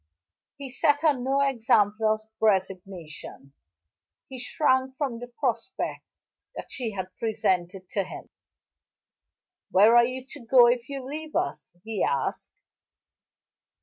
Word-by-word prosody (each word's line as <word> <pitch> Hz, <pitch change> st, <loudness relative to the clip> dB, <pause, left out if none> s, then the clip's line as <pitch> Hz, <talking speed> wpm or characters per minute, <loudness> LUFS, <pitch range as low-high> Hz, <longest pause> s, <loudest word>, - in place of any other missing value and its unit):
He 275 Hz, -2 st, -7 dB
set 290 Hz, +2 st, +2 dB
her 310 Hz, -2 st, +5 dB
no 265 Hz, +2 st, 0 dB
example 220 Hz, -5 st, +2 dB
of 215 Hz, -, -6 dB, 0.2 s
resignation; 185 Hz, -8 st, -2 dB, 0.7 s
he 260 Hz, -1 st, -8 dB
shrank 260 Hz, 0 st, +1 dB
from 265 Hz, -6 st, -2 dB
the 245 Hz, -, -7 dB
prospect 245 Hz, -, -3 dB, 0.5 s
that -, -, -8 dB
she 225 Hz, -5 st, -4 dB, 0.2 s
presented 190 Hz, -4 st, -1 dB
to 200 Hz, -, 0 dB
him. 185 Hz, -, -10 dB, 1.4 s
"Where 215 Hz, +5 st, +6 dB
are 240 Hz, 0 st, +7 dB
you 255 Hz, +1 st, -4 dB
to 290 Hz, +2 st, -9 dB
go 240 Hz, 0 st, +6 dB
if 240 Hz, +1 st, +1 dB
you 275 Hz, -2 st, -5 dB
leave 310 Hz, +3 st, -6 dB
us?" 355 Hz, -, -2 dB
he 220 Hz, -3 st, -2 dB
asked. 135 Hz, -1 st, -1 dB
240 Hz, 120 wpm, -26 LUFS, 205-265 Hz, 1.4 s, are